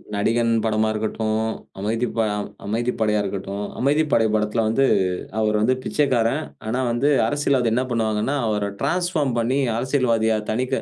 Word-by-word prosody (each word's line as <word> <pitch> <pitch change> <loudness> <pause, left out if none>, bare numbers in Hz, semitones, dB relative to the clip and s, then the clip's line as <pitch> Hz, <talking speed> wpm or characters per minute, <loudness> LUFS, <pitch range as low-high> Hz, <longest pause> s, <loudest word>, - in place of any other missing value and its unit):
நடிகன் 115 +3 +1
படமா 110 0 +1
இருக்கட்டும், 110 0 -1 0.4
அமைதி 110 +4 -1
ப - - +1 0.5
அமைதிப்படையா 110 0 0
இருக்கட்டும், 100 +1 -4
அமைதிப்படை 145 -3 +2
படத்தில 105 +1 +1
வந்து, 125 +5 +2 0.5
அவரு 110 -1 +1
வந்து 120 +4 +3
பிச்சைக்காரன். 135 0 +1 0.2
ஆனா, 115 +4 -1
வந்து 120 +5 +1 0.2
அரசியல்வாதி 135 -2 +1
என்ன 125 +2 +1
பண்ணுவாங்கன்னா, 110 +2 0
அவர 105 -1 0
டிரான்ஸ்பார்ம் 160 -3 0
பண்ணி, 125 +4 +1 0.2
அரசியல்வாதியா, 115 -3 +1
தனி 125 +4 0
க 135 - 0
115 Hz, 135 wpm, -22 LUFS, 110-130 Hz, 0.5 s, வந்து